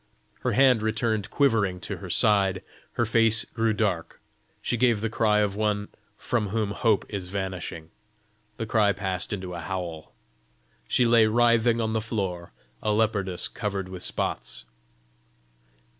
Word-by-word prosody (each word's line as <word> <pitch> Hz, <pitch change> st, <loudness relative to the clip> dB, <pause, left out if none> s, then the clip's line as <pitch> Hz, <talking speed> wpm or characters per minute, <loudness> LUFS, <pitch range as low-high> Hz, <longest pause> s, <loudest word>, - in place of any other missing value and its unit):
Her -, -, -1 dB
hand 130 Hz, -4 st, +5 dB
returned 110 Hz, -1 st, -1 dB
quivering 105 Hz, -10 st, +2 dB
to -, -, -4 dB
her -, -, -9 dB
side. 100 Hz, -3 st, +3 dB, 0.3 s
Her 120 Hz, -, +1 dB
face 110 Hz, -1 st, +3 dB
grew 115 Hz, -1 st, 0 dB
dark. 100 Hz, -6 st, -1 dB, 0.4 s
She -, -, -1 dB
gave 120 Hz, -2 st, +3 dB
the 110 Hz, +1 st, -2 dB
cry 105 Hz, -2 st, +3 dB
of 100 Hz, -2 st, 0 dB
one 105 Hz, -1 st, -1 dB, 0.3 s
from 115 Hz, -4 st, -1 dB
whom 105 Hz, 0 st, -1 dB
hope 110 Hz, -1 st, +1 dB
is 95 Hz, -4 st, -5 dB
vanishing. 90 Hz, -4 st, -5 dB, 0.7 s
The 115 Hz, -, -3 dB
cry 105 Hz, -2 st, +3 dB
passed 95 Hz, -2 st, -2 dB
into 95 Hz, -3 st, -4 dB
a 85 Hz, -, -5 dB
howl. 85 Hz, -2 st, -5 dB, 0.7 s
She 125 Hz, -, +3 dB
lay 115 Hz, -2 st, +5 dB
writhing 115 Hz, 0 st, +3 dB
on 110 Hz, -1 st, -1 dB
the 110 Hz, -, 0 dB
floor, 95 Hz, -6 st, -3 dB, 0.3 s
a 105 Hz, -, 0 dB
leopardess 105 Hz, -4 st, 0 dB
covered 100 Hz, -5 st, -4 dB
with 90 Hz, -1 st, -7 dB
spots. -, -, -2 dB
105 Hz, 145 wpm, -26 LUFS, 95-115 Hz, 0.7 s, hand